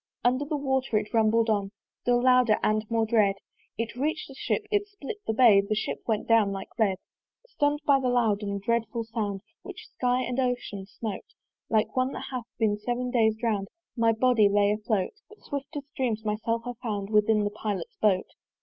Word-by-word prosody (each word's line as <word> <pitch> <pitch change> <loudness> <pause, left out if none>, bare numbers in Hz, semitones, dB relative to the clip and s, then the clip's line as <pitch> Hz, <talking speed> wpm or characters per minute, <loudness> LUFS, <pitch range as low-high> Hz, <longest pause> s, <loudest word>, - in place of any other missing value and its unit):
Under 255 +4 +2
the 300 +1 -2
water 265 -4 0
it 210 - -3
rumbled 225 0 +3
on, 205 -3 +1 0.3
Still 245 0 +2
louder 250 -4 +5
and 215 0 +1
more 225 -1 +1
dread: 210 -3 +3 0.4
It 230 0 -3
reach'd 290 +2 -2
the - - -9
Ship, 415 - -2
it 410 -1 +1
split 405 -1 -7
the - - +2
bay; 220 -4 +6
The 200 +2 -2
Ship 215 - -2
went 220 -2 0
down 225 -3 +4
like 195 0 -6
lead. 200 -4 +2 0.5
Stunn'd 295 -10 0
by 280 -2 +5
that 255 -2 0
loud 225 -4 +2
and 200 -1 -3
dreadful 230 +2 -1
sound, 215 -4 -3 0.2
Which - - -10
sky 250 0 0
and 250 +1 -2
ocean 245 -6 -2
smote: 220 - -7 0.3
Like 220 -1 +1
one 255 +1 +1
that - - -6
hath 250 -3 -4
been 210 -2 +1
seven 245 +3 -2
days 220 -3 +3
drown'd 220 -3 -1 0.3
My 230 -2 +3
body 225 -2 +4
lay 205 0 +3
afloat: 210 -2 -1 0.2
But, 430 - -17
swift 285 +2 -5
as 285 - -4
dreams, 225 -4 -1
myself 225 +2 -1
I 245 - -3
found 205 -3 -3
Within 210 0 +3
the 205 - -1
Pilot's 205 -4 -4
boat. 195 -3 +3
225 Hz, 195 wpm, -27 LUFS, 210-250 Hz, 0.5 s, bay